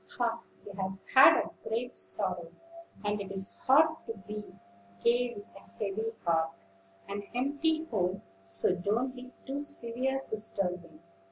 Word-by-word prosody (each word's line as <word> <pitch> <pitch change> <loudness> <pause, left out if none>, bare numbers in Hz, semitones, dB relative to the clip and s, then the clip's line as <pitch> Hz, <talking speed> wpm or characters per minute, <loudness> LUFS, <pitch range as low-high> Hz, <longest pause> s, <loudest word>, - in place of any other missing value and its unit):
"Ah! 230 -1 +1 0.2
he 205 - -8
has 190 0 -4
had 265 +1 +10
a - - -2 0.2
great 240 +3 -2
sorrow, 180 -4 -2 0.5
and 205 0 0
it 195 - -6
is 195 0 -2
hard 310 +4 +6
to 225 - -3
be 210 0 -4 0.6
gay 240 0 +3
with 205 - -8
a - - -10 0.2
heavy 215 +2 -1
heart, 165 -1 +2 0.5
an 200 +1 -3
empty 300 +5 +1
home; 190 - -1 0.2
so 95 - +2
don't 215 +8 0
be 250 0 -9
too 275 +2 -3
severe, 260 -1 -1
Sister 215 -6 -1
Wing." 170 -2 -11
220 Hz, 150 wpm, -31 LUFS, 190-255 Hz, 0.6 s, had